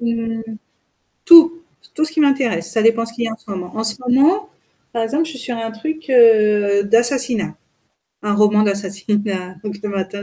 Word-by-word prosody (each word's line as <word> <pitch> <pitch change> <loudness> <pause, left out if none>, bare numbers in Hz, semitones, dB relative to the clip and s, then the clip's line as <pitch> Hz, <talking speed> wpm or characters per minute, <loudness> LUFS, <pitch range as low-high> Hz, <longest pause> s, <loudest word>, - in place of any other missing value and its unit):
Mmh. 230 -1 -3 0.8
Tout! 335 -1 +7 0.3
Tout 310 - 0
ce 315 - 0
qui 320 - -1
m'intéresse, 260 - +1
ça 220 - +1
dépend 230 0 +2
ce 230 - -4
qu'il 235 0 -4
y - - -2
a - - -6
en 220 - -8
ce 225 - -25
moment. 180 -1 -7
En 220 - -3
ce 220 -1 +3
moment, 310 +12 +2 0.4
par 230 - -2
exemple, 290 +8 -1
je - - -7
suis 270 - -10
sur 245 -1 -5
un 225 0 -5
truc 315 +8 -7
heu, 210 -4 +4
d'assassinat, 235 +1 +1 0.7
un 205 -1 -1
roman 210 0 +3
d'assassinat 195 -1 -3
donc 205 -1 -5
le 210 - -4
matin 195 0 -5
225 Hz, 195 wpm, -18 LUFS, 205-255 Hz, 0.8 s, Tout